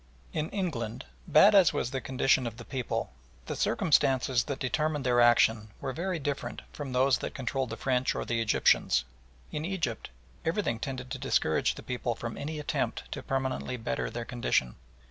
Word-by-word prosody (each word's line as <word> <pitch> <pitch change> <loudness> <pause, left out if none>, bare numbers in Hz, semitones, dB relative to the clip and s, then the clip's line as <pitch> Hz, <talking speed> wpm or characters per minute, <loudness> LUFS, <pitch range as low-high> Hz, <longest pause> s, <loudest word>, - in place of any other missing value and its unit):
In 155 0 -1
England, 125 - -3 0.2
bad 200 +7 +7
as 190 -5 +6
was 120 - -1
the 135 -1 -2
condition 130 -1 +2
of 115 -1 -7
the 115 - -9
people, 130 -3 -3 0.3
the - - -4
circumstances 130 -5 +2
that 140 -2 -3
determined 150 +2 -1
their 120 -1 +4
action 115 -2 +4
were 135 -1 -3
very 180 +3 -2
different 140 -5 -4
from 145 -3 -6
those 130 0 +3
that - - -5
controlled 130 0 -2
the - - -5
French 130 -1 +1
or - - -3
the 115 -1 0
Egyptians. - - +3 0.5
In 150 0 -3
Egypt 165 - -2 0.3
everything 165 - 0
tended 130 0 -5
to - - -4
discourage - - +1
the - - -9
people 125 -1 -2
from 115 0 -5
any 150 +2 -4
attempt 150 - -2
to - - -4
permanently 130 -1 -2
better 115 +1 -2
their 120 -1 -5
condition. 115 - 0
130 Hz, 175 wpm, -29 LUFS, 120-150 Hz, 0.5 s, bad